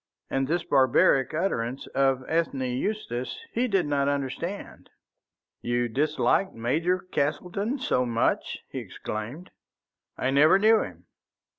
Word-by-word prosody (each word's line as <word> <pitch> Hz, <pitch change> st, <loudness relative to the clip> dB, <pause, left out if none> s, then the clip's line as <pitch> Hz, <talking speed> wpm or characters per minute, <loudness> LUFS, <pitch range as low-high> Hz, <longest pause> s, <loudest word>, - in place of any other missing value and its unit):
And 135 Hz, 0 st, 0 dB
this 170 Hz, +3 st, 0 dB
barbaric 130 Hz, -1 st, +4 dB
utterance 135 Hz, -8 st, -1 dB
of 135 Hz, -1 st, +2 dB
Ethne 160 Hz, -4 st, 0 dB
Eustace 125 Hz, -, -3 dB
he 245 Hz, +2 st, 0 dB
did 195 Hz, -6 st, +1 dB
not 140 Hz, -1 st, +1 dB
understand. 145 Hz, +7 st, -4 dB, 0.7 s
"You 120 Hz, 0 st, 0 dB
disliked 150 Hz, -, +1 dB
Major 160 Hz, +11 st, +1 dB
Castleton 185 Hz, -, -2 dB
so 185 Hz, -, +1 dB
much?" 115 Hz, -1 st, 0 dB
he -, -, -4 dB
exclaimed. 115 Hz, +12 st, -6 dB, 0.7 s
"I 130 Hz, -, 0 dB
never 150 Hz, +7 st, +6 dB
knew 220 Hz, +2 st, +5 dB
him." 90 Hz, -1 st, -8 dB
140 Hz, 120 wpm, -26 LUFS, 125-180 Hz, 0.7 s, never